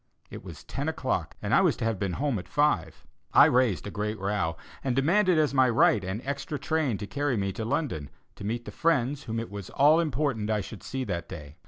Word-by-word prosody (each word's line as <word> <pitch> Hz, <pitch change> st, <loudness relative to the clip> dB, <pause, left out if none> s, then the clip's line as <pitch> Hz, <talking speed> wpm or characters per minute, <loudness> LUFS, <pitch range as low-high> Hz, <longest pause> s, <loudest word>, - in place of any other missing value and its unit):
It -, -, -8 dB
was -, -, -10 dB
ten -, -, -3 dB
o'clock, -, -, -2 dB
and -, -, -1 dB
I -, -, +6 dB
was -, -, +2 dB
to -, -, -2 dB
have 115 Hz, -4 st, -1 dB
been 100 Hz, -3 st, -1 dB
home 135 Hz, -3 st, -1 dB
at 90 Hz, -, -10 dB
five. 145 Hz, -, 0 dB, 0.3 s
I -, -, +9 dB
raised 125 Hz, -8 st, +2 dB
a 105 Hz, -, -5 dB
great 105 Hz, +1 st, -3 dB
row, 95 Hz, -5 st, -1 dB, 0.3 s
and 130 Hz, -3 st, 0 dB
demanded 175 Hz, +6 st, +3 dB
as 150 Hz, -3 st, +2 dB
my 130 Hz, -2 st, +4 dB
right 110 Hz, -3 st, +4 dB
an 95 Hz, +6 st, -4 dB
extra 140 Hz, +2 st, -3 dB
train 140 Hz, -4 st, 0 dB
to 105 Hz, -, -5 dB
carry 145 Hz, +2 st, -1 dB
me 100 Hz, -1 st, -1 dB
to 110 Hz, -, -4 dB
London, 110 Hz, -, -2 dB, 0.3 s
to -, -, -9 dB
meet 115 Hz, +3 st, -3 dB
the -, -, -7 dB
friends 145 Hz, -3 st, 0 dB
whom 115 Hz, 0 st, -2 dB
it 115 Hz, -, -6 dB
was 100 Hz, -2 st, -7 dB
all 150 Hz, +4 st, +5 dB
important 140 Hz, -8 st, -1 dB
I 105 Hz, -1 st, +1 dB
should 100 Hz, +1 st, -9 dB
see 130 Hz, -1 st, -4 dB
that 85 Hz, -7 st, -4 dB
day. 75 Hz, -2 st, -9 dB
115 Hz, 230 wpm, -27 LUFS, 100-145 Hz, 0.3 s, I